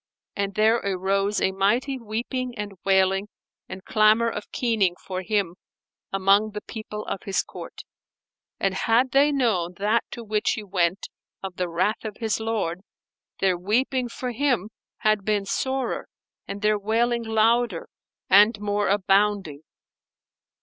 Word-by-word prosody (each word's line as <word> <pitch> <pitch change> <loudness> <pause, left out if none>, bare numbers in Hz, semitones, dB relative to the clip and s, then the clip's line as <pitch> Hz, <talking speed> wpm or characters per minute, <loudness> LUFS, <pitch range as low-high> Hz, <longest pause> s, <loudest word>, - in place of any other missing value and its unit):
And 200 -1 -2
there 220 +2 +4
arose 195 0 0
a 190 - +1
mighty 235 +8 +1
weeping 240 +2 -4
and 210 -1 -4
wailing 195 +1 +2 0.4
and 190 - -8
clamour 215 +2 +4
of 210 - -7
keening 215 -7 +1
for 185 -1 -3
him 190 -3 -1 0.5
among 195 +2 +3
the 210 - -5
people 215 -1 -7
of - - -4
his 195 - -1
court, - - -10 0.8
and 195 -1 +1
had 230 +6 +2
they 280 +3 +4
known 205 -11 0
that 210 +3 +1
to 235 - -7
which 215 +1 0
he 220 - -5
went 185 -1 0 0.4
of 190 -2 -6
the 180 -1 -1
wrath 185 +6 0
of 215 -2 -6
his 225 -2 -1
Lord, 215 -6 -2 0.6
their 190 -2 +3
weeping 245 +6 0
for 250 +1 -4
him 240 -5 0 0.3
had 215 -2 +2
been 205 -1 0
sorer 260 +6 -2 0.4
and 200 +1 -6
their 210 0 +3
wailing 235 +3 +1
louder 225 -3 +1 0.4
and 210 +3 +6
more 205 -1 0
abounding. 195 -5 +1
210 Hz, 145 wpm, -24 LUFS, 195-230 Hz, 0.8 s, and